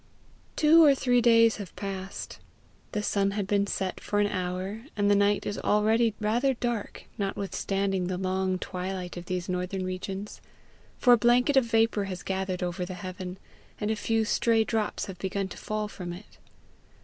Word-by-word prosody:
Two 320 +2 +6
or 285 -3 +7
three 245 -2 +2
days 230 -1 +5
have 200 -5 -8
passed. 195 -1 -6 0.5
The 210 - -2
sun 200 -1 +1
had 205 - 0
been 200 0 +1
set 190 -2 -2
for 205 - -1
an 205 - +4
hour, 185 +3 -3
and 205 0 +3
the - - +5
night 205 0 +2
is 205 - -3
already 220 +1 +2
rather 240 +5 +1
dark 235 -3 -3 0.2
notwithstanding 195 -1 -1
the 185 0 -2
long 185 0 0
twilight 185 0 -5
of 175 0 -7
these 180 -1 -3
northern 180 +1 -2
regions, 190 +2 -5 0.6
for 245 - +6
a - - +7
blanket 245 +5 +3
of 265 -3 +5
vapour 225 -3 +2
has 185 -2 -6
gathered 190 -1 -2
over 175 0 -2
the 180 +1 -5
heaven, 185 -1 -6 0.4
and 210 0 -1
a - - +1
few 225 +1 0
stray 225 0 +3
drops 220 -1 -1
have 185 -3 -9
begun 195 +1 -2
to - - -9
fall 215 0 -3
from 180 -4 -7
it. 185 +4 -13
200 Hz, 175 wpm, -28 LUFS, 185-225 Hz, 0.6 s, or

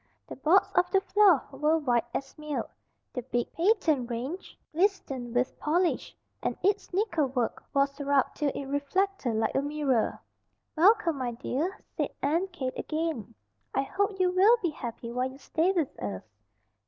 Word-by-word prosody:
The - - -7
boards 320 +8 +3
of 360 - +3
the 390 - +4
floor 390 -5 +4
were 300 +4 +2
white 240 -7 +1
as 270 +2 -4
milk. 300 -1 -4 0.4
The 250 - -3
big, 240 -1 -2
patent 330 - +2
range 260 +10 -5 0.2
glistened 305 - 0
with 250 +1 0
polish, 345 +4 0 0.2
and - - -2
its 405 +2 +1
nickel 355 -6 +1
work 250 -3 -2
was 275 0 +1
rubbed 280 -1 +2
till 295 - +1
it 280 - -4
reflected 285 - 0
like 220 0 +1
a 270 - +2
mirror. 285 -5 0 0.6
"Welcome, 345 -3 +4
my 245 -2 -2
dear!" 295 - -2 0.2
said - - -1
Aunt 335 +7 +1
Kate 265 -8 -3
again. 310 - -3 0.4
"I 270 - +2
hope 395 +5 -1
you 365 -1 +3
will 400 +6 +6
be 340 - +1
happy 235 -4 -6
while 250 +2 -1
you 265 - -12
stay 325 +6 +1
with 335 -7 -1
us." 100 -3 -4
300 Hz, 165 wpm, -28 LUFS, 260-365 Hz, 0.6 s, will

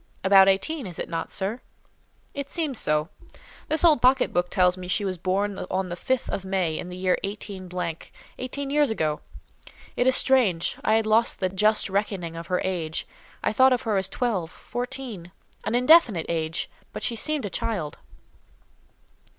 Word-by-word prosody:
"About 195 0 +7
eighteen, 235 +8 0
is 175 - -8
it - - -4
not, 165 0 -3
sir?" 205 +6 -3 0.7
"It 280 -1 -5
seems 300 -8 -3
so. 150 +1 0 0.6
This 315 +1 +1
old 310 -7 +5
pocket 255 +1 +3
book 175 0 +1
tells 180 -2 +3
me 185 -1 -8
she 190 +3 0
was 185 -2 -3
born 195 +3 -1
on 185 0 -1
the 175 - -4
5th 255 +7 -1
of 195 - -3
May, 185 -4 -1
in 180 - -6
the 180 - -7
year 185 -1 +1
18—, 185 -4 -5 0.3
eighteen 275 +2 -4
years 295 0 +3
ago. 155 -8 -1 0.7
It 245 - +1
is 260 - +6
strange; 215 -11 +3
I 215 - +3
had 225 0 +2
lost 220 +2 +3
the 185 - 0
just 210 +3 +2
reckoning 195 -4 -2
of 165 0 -7
her 180 0 0
age. 165 -4 -2 0.4
I - - +1
thought 260 +3 +5
of 245 - -1
her 220 -3 0
as 190 0 0
twelve—fourteen—an 230 0 -4
indefinite 250 - +5
date; 160 -1 -2 0.3
but - - -6
she 235 - -1
seemed 300 +3 -1
a 200 - -5
child." 175 -8 -3
195 Hz, 170 wpm, -25 LUFS, 180-245 Hz, 0.7 s, About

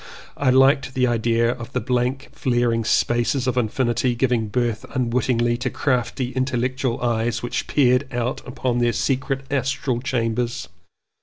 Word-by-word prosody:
I 140 - +1
liked 135 +1 +4
the 130 -1 +3
idea 115 0 +2
of 120 -2 -8
the - - +1
blank 125 +3 -1
flaring 120 -5 0
spaces 120 +3 +1
of 130 - +1
infi 125 +1 0
nity 120 +1 0
giving 120 -3 +1
birth 120 0 -1
unwittingly 120 -1 +1
to 125 +1 -2
crafty 125 -1 -1
intellectual 130 -1 -1
eyes 120 0 0
which 120 - -3
peered 130 -1 +2
out 120 +1 -2
upon 125 -1 -1
their 120 -1 +2
secret 135 +3 -1
astral 135 -2 -1
chambers. 120 -1 -2
125 Hz, 145 wpm, -22 LUFS, 120-130 Hz, -, liked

